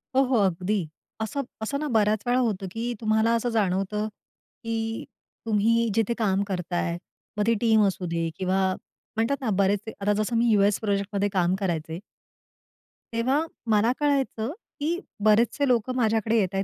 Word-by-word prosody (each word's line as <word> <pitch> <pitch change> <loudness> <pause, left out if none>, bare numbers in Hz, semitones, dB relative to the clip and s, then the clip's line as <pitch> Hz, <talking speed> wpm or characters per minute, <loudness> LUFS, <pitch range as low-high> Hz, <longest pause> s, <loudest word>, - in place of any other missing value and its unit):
हो, 270 - +6
हो 255 -2 +2
अगदी. 185 +3 0 0.4
असं 220 +6 -2 0.2
असं 280 +6 -2
ना, 300 - -2
बऱ्याच 215 -2 +2
वेळा 245 +1 +3
होतं, 205 -6 -1
की 235 +3 -3
तुम्हाला 220 +1 +2
असं 240 +1 0
जाणवतं, 200 +1 0 0.6
की 225 0 -3 0.4
तुम्ही 230 +2 +2
जिथे 225 +1 +2
काम 200 -3 +1
करताय. 175 -2 -2 0.4
मग 210 - +1
ती 230 - +5
टीम 220 -2 +4
असू 185 -1 -3
दे 165 -1 -1
किंवा 190 0 0 0.6
म्हणतात 230 +5 +1
ना, 245 - -1
बरेच 205 +3 0
आता 205 +1 +1
जसं 230 +2 -2
मी 235 0 +3
यूएस 205 -1 +3
प्रोजेक्टमध्ये 200 -1 0
काम 185 -2 +1
करायचे. 165 -3 -2 1.1
तेव्हा 265 +7 +1 0.2
मला 220 +2 +4
कळायचं, 275 -5 0 0.3
की 330 +5 0 0.2
बरेचसे 230 +6 +3
लोकं 250 +1 +1
माझ्याकडे 225 -1 +2
येतायत 195 -1 0
215 Hz, 150 wpm, -26 LUFS, 195-230 Hz, 1.1 s, हो